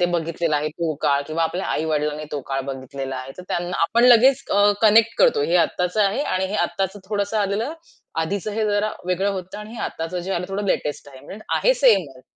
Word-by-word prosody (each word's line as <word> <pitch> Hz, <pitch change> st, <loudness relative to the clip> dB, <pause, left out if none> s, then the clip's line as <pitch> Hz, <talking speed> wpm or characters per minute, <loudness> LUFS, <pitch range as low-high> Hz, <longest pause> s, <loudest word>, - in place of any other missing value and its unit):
ते 175 Hz, -, +4 dB
बघितलेलं 165 Hz, -2 st, 0 dB
आहे 150 Hz, +1 st, -1 dB
तो 160 Hz, 0 st, -3 dB
काळ 140 Hz, -2 st, +2 dB
किंवा 160 Hz, +1 st, -1 dB
आपल्या 175 Hz, +3 st, -2 dB
आई-वडिलांनी 150 Hz, -1 st, -1 dB
तो 145 Hz, -, -2 dB
काळ 135 Hz, 0 st, 0 dB
बघितलेला 135 Hz, 0 st, -5 dB
आहे. 130 Hz, +1 st, -7 dB
तर -, -, -7 dB
त्यांना 175 Hz, +1 st, -2 dB
आपण 230 Hz, +8 st, +3 dB
लगेच 250 Hz, +2 st, +6 dB
अ, 205 Hz, +1 st, +5 dB
कनेक्ट 225 Hz, +1 st, +5 dB
करतो. 470 Hz, -3 st, +4 dB
हे -, -, +2 dB
आत्ताचं 180 Hz, +3 st, +1 dB
आहे 200 Hz, +7 st, +1 dB
आणि 190 Hz, -9 st, -1 dB
हे 200 Hz, -, -5 dB
आत्ताचं 195 Hz, 0 st, -3 dB
थोडंसं 205 Hz, +1 st, -1 dB
आलेलं 210 Hz, +7 st, -1 dB, 0.5 s
आधीच 195 Hz, +5 st, -2 dB
हे 220 Hz, +1 st, -1 dB
जरा 205 Hz, +1 st, 0 dB
वेगळं 190 Hz, +2 st, +1 dB
होतं 190 Hz, +1 st, -6 dB
आणि 210 Hz, +1 st, -9 dB
हे -, -, -8 dB
आत्ताचं 165 Hz, +3 st, -4 dB
जे 190 Hz, +2 st, -4 dB
आलं 180 Hz, -1 st, -2 dB
थोडं 200 Hz, +2 st, -3 dB
लेटेस्ट 145 Hz, -5 st, -2 dB
आहे. 130 Hz, -1 st, -13 dB
म्हणजे 210 Hz, +7 st, -10 dB
आहे -, -, +3 dB
सेमच. 185 Hz, -, +2 dB
185 Hz, 210 wpm, -22 LUFS, 155-210 Hz, 0.5 s, लगेच